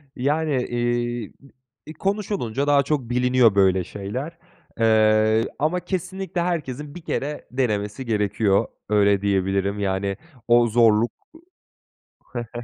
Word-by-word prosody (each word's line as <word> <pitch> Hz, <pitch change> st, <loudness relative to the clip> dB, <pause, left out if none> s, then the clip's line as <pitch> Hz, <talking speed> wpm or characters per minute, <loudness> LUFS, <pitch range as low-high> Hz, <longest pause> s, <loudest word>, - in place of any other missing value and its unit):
yani, 150 Hz, +3 st, 0 dB
eee, 120 Hz, -2 st, -2 dB
b 140 Hz, -, -19 dB, 0.4 s
iii, 155 Hz, -, -7 dB
konuşulunca 190 Hz, -, -2 dB
daha 145 Hz, -1 st, +4 dB
çok 140 Hz, -4 st, -2 dB
biliniyor 125 Hz, -3 st, +3 dB
böyle 95 Hz, -2 st, +3 dB
şeyler. 125 Hz, -, -6 dB, 0.4 s
Eee, 110 Hz, 0 st, +3 dB
ama 155 Hz, +5 st, +1 dB
kesinlikle 185 Hz, 0 st, -4 dB
herkesin 150 Hz, -5 st, -3 dB
1 175 Hz, -, -8 dB
kere 150 Hz, -2 st, -4 dB
denemesi 110 Hz, -1 st, -2 dB
gerekiyor 105 Hz, -2 st, +1 dB, 0.2 s
öyle 100 Hz, -2 st, +3 dB
diyebilirim. 100 Hz, 0 st, 0 dB
Yani 100 Hz, 0 st, -1 dB, 0.3 s
o 120 Hz, 0 st, +5 dB
zorluk 115 Hz, 0 st, +3 dB, 1.5 s
ı -, -, -7 dB
120 Hz, 115 wpm, -23 LUFS, 105-145 Hz, 1.5 s, o